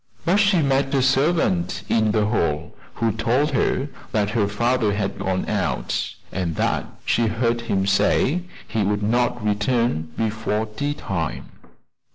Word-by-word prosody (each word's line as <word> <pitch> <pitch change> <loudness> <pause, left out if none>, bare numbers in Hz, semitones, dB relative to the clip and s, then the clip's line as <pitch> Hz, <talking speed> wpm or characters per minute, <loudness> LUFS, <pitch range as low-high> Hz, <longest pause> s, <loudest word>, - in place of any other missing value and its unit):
But 180 +4 +3
she 200 -5 +4
met 135 0 +1
a 135 - +3
servant 135 - +1
in 110 -1 +2
the 105 -1 +2
hall 80 -7 -1 0.2
who 115 0 +1
told 120 +7 +1
her 135 0 +1 0.3
that 105 -1 +1
her 110 -3 +1
father 115 +1 +1
had 100 -2 -2
gone 95 -1 -1
out, - - -1 0.2
and 90 -4 -2
that - - 0 0.2
she 115 -1 +2
heard 115 +1 0
him 95 -4 0
say 130 - +2 0.3
he 110 0 -1
would 105 +1 0
not 120 +1 +1
return 105 -6 0
before 110 -1 -1
tea 145 +7 -3
time. 85 - -4
110 Hz, 150 wpm, -22 LUFS, 100-130 Hz, 0.3 s, she